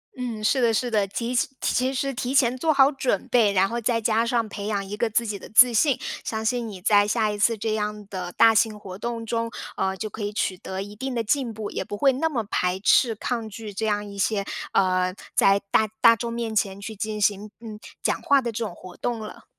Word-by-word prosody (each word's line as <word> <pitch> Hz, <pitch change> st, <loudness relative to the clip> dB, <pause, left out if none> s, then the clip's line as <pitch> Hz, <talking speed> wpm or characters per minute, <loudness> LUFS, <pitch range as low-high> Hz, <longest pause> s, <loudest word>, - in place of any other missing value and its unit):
嗯， 240 Hz, -4 st, -5 dB
是 255 Hz, +4 st, +2 dB
的 230 Hz, -1 st, +4 dB
是 240 Hz, +2 st, -1 dB
的， 205 Hz, -3 st, +2 dB
提 235 Hz, +5 st, -3 dB
是 245 Hz, -, +2 dB
其 255 Hz, +1 st, 0 dB
实 275 Hz, +1 st, -2 dB
提 250 Hz, +2 st, -3 dB
前 250 Hz, -2 st, +4 dB
做 315 Hz, +5 st, +1 dB
好 275 Hz, -1 st, +5 dB
准 260 Hz, -8 st, -1 dB
备， 225 Hz, -4 st, +4 dB
然 195 Hz, 0 st, +3 dB
后 235 Hz, +3 st, -3 dB
再 230 Hz, 0 st, +1 dB
加 225 Hz, +1 st, +2 dB
上 235 Hz, -1 st, 0 dB
培 205 Hz, 0 st, -6 dB
养 200 Hz, -2 st, -2 dB
一 205 Hz, -, -5 dB
个 230 Hz, +1 st, 0 dB
自 235 Hz, +2 st, +1 dB
己 210 Hz, -2 st, -4 dB
的 -, -, -11 dB
自 245 Hz, +2 st, +7 dB
信， 270 Hz, +3 st, +3 dB, 0.2 s
相 220 Hz, 0 st, -3 dB
信 235 Hz, -1 st, -1 dB
你 195 Hz, -, -9 dB
在 205 Hz, +2 st, +4 dB
下 215 Hz, -1 st, +1 dB
一 205 Hz, -, -4 dB
次 225 Hz, +2 st, +3 dB
这 215 Hz, +1 st, -2 dB
样 210 Hz, -1 st, -3 dB
的 180 Hz, -2 st, -5 dB
大 225 Hz, 0 st, +6 dB
型 220 Hz, -1 st, +2 dB
活 190 Hz, -2 st, -9 dB
动 230 Hz, -1 st, -4 dB
中， 230 Hz, 0 st, -2 dB, 0.3 s
呃， 190 Hz, 0 st, -1 dB
就 215 Hz, +1 st, -5 dB
可 220 Hz, -, -8 dB
以 205 Hz, 0 st, -2 dB
取 190 Hz, -2 st, -1 dB
得 190 Hz, 0 st, -5 dB
一 205 Hz, +1 st, -11 dB
定 260 Hz, +3 st, -4 dB
的 230 Hz, -, 0 dB
进 250 Hz, +2 st, 0 dB
步， 215 Hz, -1 st, -6 dB
也 -, -, -3 dB
不 205 Hz, -, -6 dB
会 270 Hz, +5 st, +4 dB
那 320 Hz, +6 st, 0 dB
么 245 Hz, -7 st, -2 dB
排 185 Hz, -2 st, -1 dB
斥、 225 Hz, +3 st, +4 dB
抗 225 Hz, 0 st, -3 dB
拒 215 Hz, -1 st, -8 dB
这 220 Hz, +2 st, -2 dB
样 205 Hz, 0 st, 0 dB
一 200 Hz, -1 st, -9 dB
些 200 Hz, 0 st, 0 dB, 0.3 s
呃， 185 Hz, -1 st, +2 dB, 0.2 s
在 195 Hz, 0 st, +4 dB
大 220 Hz, -, +4 dB
大 230 Hz, -1 st, +7 dB
众 235 Hz, +1 st, -4 dB
面 230 Hz, -2 st, -3 dB
前 195 Hz, -2 st, 0 dB
去 215 Hz, +2 st, -7 dB
进 215 Hz, +1 st, -4 dB
行， 205 Hz, +1 st, 0 dB
嗯， 220 Hz, -2 st, -9 dB, 0.2 s
讲 -, -, 0 dB
话 280 Hz, -1 st, +4 dB
的 240 Hz, -3 st, -3 dB
这 230 Hz, +1 st, -3 dB
种 205 Hz, -6 st, -5 dB
活 180 Hz, 0 st, -12 dB
动 240 Hz, -1 st, -2 dB
了。 215 Hz, -, -9 dB
220 Hz, 265 characters per minute, -24 LUFS, 205-235 Hz, 0.3 s, 自